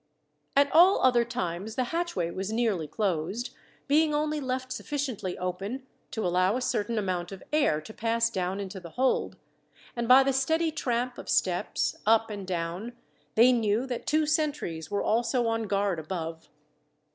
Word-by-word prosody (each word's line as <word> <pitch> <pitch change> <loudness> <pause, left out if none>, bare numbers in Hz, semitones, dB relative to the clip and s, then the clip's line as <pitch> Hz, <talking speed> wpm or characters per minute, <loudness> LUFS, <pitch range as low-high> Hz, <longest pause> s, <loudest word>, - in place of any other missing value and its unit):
At 280 0 +4
all 355 +5 +6
other 245 -2 +5
times 215 -3 -4
the 255 - +1
hatchway 330 - -1
was 190 +3 -4
nearly 220 -8 0
closed, 195 - -2 0.4
being 300 +1 +3
only 300 0 0
left 255 -1 -3
sufficiently 260 -9 -3
open 195 +8 -4 0.2
to 220 - -3
allow 185 +5 +2
a - - -3
certain 230 -2 -1
amount 185 -3 -2
of 195 - -9
air 280 - +3
to 220 - -11
pass 230 +1 +1
down 190 -2 -2
into 195 -1 -5
the 175 -2 -10
hold, 255 +8 0 0.6
and 235 -1 -2
by 260 +2 +8
the 270 0 +1
steady 320 +5 +1
tramp 245 -4 -2
of - - -9
steps, - - 0
up 225 0 +4
and 200 -3 -6
down, 180 +6 -3 0.4
they 235 +3 +7
knew 225 0 +1
that 250 -3 -5
two 310 0 +3
sentries 295 - -1
were 205 - -1
also 235 +2 +1
on 225 -1 -1
guard 200 -3 0
above. 165 0 -5
225 Hz, 165 wpm, -28 LUFS, 185-260 Hz, 0.6 s, by